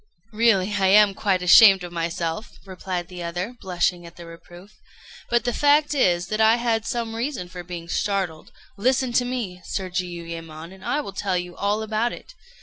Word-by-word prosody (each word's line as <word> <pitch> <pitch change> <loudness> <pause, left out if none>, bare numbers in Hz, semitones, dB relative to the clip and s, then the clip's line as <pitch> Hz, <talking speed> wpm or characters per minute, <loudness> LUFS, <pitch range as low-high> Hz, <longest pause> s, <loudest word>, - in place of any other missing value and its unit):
"Really 210 -3 +2
I 195 -2 +2
am 205 +1 +6
quite 190 -2 0
ashamed 195 +1 +7
of 175 - -7
myself," 170 +3 -4
replied 185 -2 -5
the 180 -1 -9
other, 175 +7 -4
blushing 175 -1 -1
at 170 0 -13
the 170 - -11
reproof; 175 +3 -14 0.6
"but 240 -2 +2
the 245 0 -1
fact 295 +2 +3
is 175 -11 +2
that 215 +1 -1
I 220 +1 +6
had 230 -2 -1
some 230 -2 -3
reason 235 -5 -3
for 180 0 -8
being 175 -1 -8
startled. 185 -4 -2 0.3
Listen 255 +3 +1
to 245 - +2
me, 230 -8 -4
Sir 190 -2 -4
Jiuyémon, 170 -2 -6
and 190 - -15
I 295 - -1
will 200 - -8
tell 195 -2 -1
you 175 -1 -5
all 205 +2 -1
about 220 +2 -1
it. - - -12
190 Hz, 185 wpm, -23 LUFS, 175-225 Hz, 0.6 s, ashamed